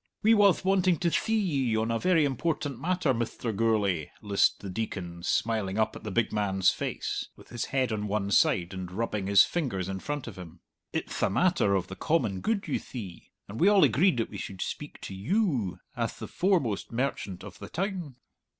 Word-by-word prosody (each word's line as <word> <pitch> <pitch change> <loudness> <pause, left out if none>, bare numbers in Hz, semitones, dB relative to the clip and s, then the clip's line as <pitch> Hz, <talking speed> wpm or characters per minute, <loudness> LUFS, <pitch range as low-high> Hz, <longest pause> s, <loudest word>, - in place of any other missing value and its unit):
"We 220 +2 +6
wath 200 -3 +4
wanting 185 -2 +3
to 175 0 0
thee 220 - 0
ye 140 - +1
on 110 +1 0
a 115 - 0
very 170 -2 +3
important 145 -1 -2
matter, 175 -2 +1
Mithter 115 0 -2
Gourlay," 100 -7 +1
lisped 100 -1 +2
the 100 - -6
Deacon, 90 -4 -4
smiling 105 +1 0
up 110 - +1
at - - -8
the 110 - -4
big 110 +2 0
man's 95 -3 +2
face, - - -3
with - - -17
his 120 - -3
head 130 -3 0
on 105 -1 -2
one 100 -1 -1
side, 90 -2 +3
and 95 -1 -6
rubbing 105 -1 -2
his 100 0 +7
fingers 120 - -2
in 95 0 -4
front 145 +5 -4
of 105 -6 -9
him. 85 -1 -11 0.3
"It'th - - -3
a - - +3
matter 135 - +2
of 95 - 0
the 95 - -8
common 130 - 0
good, 220 -4 -1
you 145 - 0
thee; 100 -9 -9 0.2
and 105 +3 -7
we 185 - +5
all 205 -3 +6
agreed 145 - +4
that 115 - -1
we - - -6
should 95 -1 -4
speak 150 - -6
to - - -6
you, 125 - 0 0.2
ath - - -2
the - - -6
foremost 170 - 0
merchant 115 -7 -2
of - - -10
the 100 - -8
town!" 180 -6 -3
115 Hz, 205 wpm, -28 LUFS, 100-165 Hz, 0.3 s, his